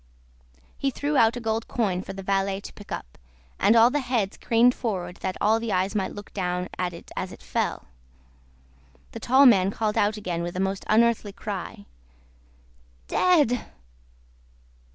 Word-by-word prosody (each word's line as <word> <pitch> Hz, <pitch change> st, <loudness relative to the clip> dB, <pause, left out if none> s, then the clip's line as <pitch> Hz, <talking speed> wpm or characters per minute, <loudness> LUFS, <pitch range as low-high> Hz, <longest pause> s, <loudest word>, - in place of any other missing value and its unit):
He 275 Hz, -, +1 dB
threw 285 Hz, +3 st, -2 dB
out 230 Hz, -1 st, +4 dB
a -, -, -3 dB
gold 225 Hz, -1 st, -2 dB
coin 195 Hz, -7 st, -1 dB
for -, -, -8 dB
the 195 Hz, 0 st, -8 dB
valet 195 Hz, 0 st, 0 dB
to -, -, -10 dB
pick 205 Hz, -, -14 dB
up, -, -, -7 dB, 0.4 s
and 205 Hz, +4 st, +4 dB
all 230 Hz, +2 st, +6 dB
the 290 Hz, -, +1 dB
heads 240 Hz, -7 st, -1 dB
craned 240 Hz, +2 st, +3 dB
forward 185 Hz, -8 st, -4 dB
that 190 Hz, -1 st, -4 dB
all 220 Hz, +2 st, +3 dB
the 230 Hz, -1 st, -3 dB
eyes 185 Hz, +1 st, 0 dB
might 195 Hz, -3 st, -1 dB
look 205 Hz, 0 st, -10 dB
down 180 Hz, -2 st, -2 dB
at 180 Hz, -1 st, -1 dB
it 170 Hz, -, -12 dB
as 185 Hz, -, -4 dB
it -, -, -13 dB
fell. -, -, -2 dB, 1.3 s
The 230 Hz, -, -7 dB
tall 260 Hz, +5 st, +5 dB
man 195 Hz, -7 st, +6 dB
called 210 Hz, +1 st, -1 dB
out 210 Hz, +1 st, +1 dB
again 180 Hz, -5 st, -3 dB
with 175 Hz, +1 st, -4 dB
a -, -, -3 dB
most 195 Hz, 0 st, -2 dB
unearthly 220 Hz, -2 st, +3 dB
cry, 195 Hz, -, -6 dB, 1.2 s
"Dead!" 295 Hz, -10 st, +3 dB
210 Hz, 170 wpm, -25 LUFS, 190-235 Hz, 1.3 s, all